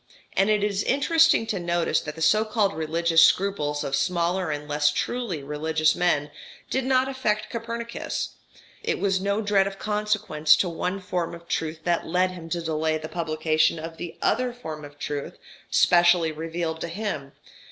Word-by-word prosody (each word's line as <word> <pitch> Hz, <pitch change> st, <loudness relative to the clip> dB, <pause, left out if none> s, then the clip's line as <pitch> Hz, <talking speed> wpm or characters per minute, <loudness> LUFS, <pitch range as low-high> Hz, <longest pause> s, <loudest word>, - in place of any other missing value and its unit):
And 195 Hz, +2 st, +2 dB
it 210 Hz, -1 st, +2 dB
is 200 Hz, -1 st, 0 dB
interesting 320 Hz, +1 st, +3 dB
to 210 Hz, -3 st, -2 dB
notice 175 Hz, -1 st, 0 dB
that 150 Hz, -, -7 dB
the 160 Hz, -, -3 dB
so 215 Hz, +6 st, +4 dB
called 210 Hz, -2 st, 0 dB
religious 165 Hz, +1 st, +2 dB
scruples 160 Hz, -6 st, +2 dB
of 135 Hz, -, -1 dB
smaller 175 Hz, +2 st, 0 dB
and 150 Hz, 0 st, -4 dB
less 145 Hz, 0 st, +2 dB
truly 190 Hz, -, -2 dB
religious 155 Hz, +2 st, +1 dB
men 150 Hz, -5 st, +1 dB, 0.4 s
did 265 Hz, -1 st, 0 dB
not 260 Hz, 0 st, +3 dB
affect 215 Hz, -5 st, -1 dB
Copernicus; 235 Hz, 0 st, -4 dB, 0.5 s
it 455 Hz, 0 st, -1 dB
was 190 Hz, -1 st, 0 dB
no 200 Hz, +2 st, 0 dB
dread 200 Hz, -1 st, +3 dB
of 195 Hz, 0 st, -6 dB
consequences 210 Hz, -8 st, +2 dB
to 180 Hz, -, 0 dB
one 180 Hz, +3 st, -3 dB
form 175 Hz, -2 st, -3 dB
of 170 Hz, 0 st, -14 dB
truth 160 Hz, -2 st, -2 dB
that 170 Hz, 0 st, 0 dB
led 180 Hz, +2 st, +1 dB
him 170 Hz, -3 st, -9 dB
to 170 Hz, 0 st, -2 dB
delay 160 Hz, 0 st, 0 dB
the 155 Hz, 0 st, -7 dB
publication 155 Hz, -1 st, +1 dB
of 165 Hz, +1 st, -7 dB
the 175 Hz, -1 st, -7 dB
other 250 Hz, +2 st, +1 dB
form 160 Hz, -11 st, -7 dB
of 145 Hz, 0 st, -11 dB
truth 145 Hz, 0 st, -5 dB, 0.3 s
specially 175 Hz, -2 st, +4 dB
revealed 160 Hz, +1 st, -4 dB
to -, -, -2 dB
him. 170 Hz, -7 st, -4 dB
175 Hz, 175 wpm, -25 LUFS, 155-210 Hz, 0.5 s, so